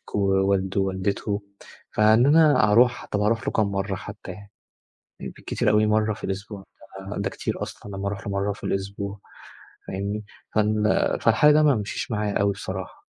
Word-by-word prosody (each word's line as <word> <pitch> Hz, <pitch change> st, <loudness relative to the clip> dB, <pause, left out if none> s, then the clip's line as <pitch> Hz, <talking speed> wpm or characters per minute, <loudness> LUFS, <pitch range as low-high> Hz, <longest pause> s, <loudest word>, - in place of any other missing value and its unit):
ووالده 95 Hz, -1 st, +1 dB
ووالدته، 100 Hz, +2 st, -2 dB, 0.5 s
فإن 110 Hz, +3 st, +4 dB
أنا 145 Hz, -7 st, +5 dB
أروح، 120 Hz, +3 st, +4 dB
طب 105 Hz, -, -2 dB
أروح 115 Hz, +2 st, +1 dB
له -, -, +1 dB
كام 110 Hz, -2 st, +2 dB
مرة 100 Hz, 0 st, -2 dB
حتى 100 Hz, 0 st, -9 dB
يعني؟ 100 Hz, +2 st, -12 dB, 0.7 s
بالكتير -, -, -2 dB
أوي 105 Hz, 0 st, +4 dB
مرة 110 Hz, 0 st, +2 dB
في -, -, -13 dB
الأسبوع، 100 Hz, 0 st, -5 dB, 0.5 s
ده 100 Hz, -1 st, -1 dB
كتير -, -, -5 dB
أصلًا، 100 Hz, -1 st, -8 dB
لمَّا 100 Hz, +1 st, -3 dB
أروح 100 Hz, 0 st, -5 dB
له 100 Hz, -, -3 dB
مرة 100 Hz, +1 st, 0 dB
في -, -, -16 dB
الأسبوع. 100 Hz, +1 st, -3 dB, 0.7 s
فاهمني؟ 100 Hz, +2 st, -4 dB, 0.3 s
فال 105 Hz, 0 st, +2 dB, 0.4 s
فالحل 115 Hz, +7 st, +5 dB
ده 155 Hz, +1 st, +5 dB
ما 145 Hz, -3 st, +4 dB
مشيش 105 Hz, +2 st, -4 dB
معايا 105 Hz, -1 st, -1 dB
أوي 100 Hz, 0 st, +3 dB
بصراحة. 95 Hz, -1 st, -7 dB
100 Hz, 160 wpm, -24 LUFS, 100-110 Hz, 0.7 s, أنا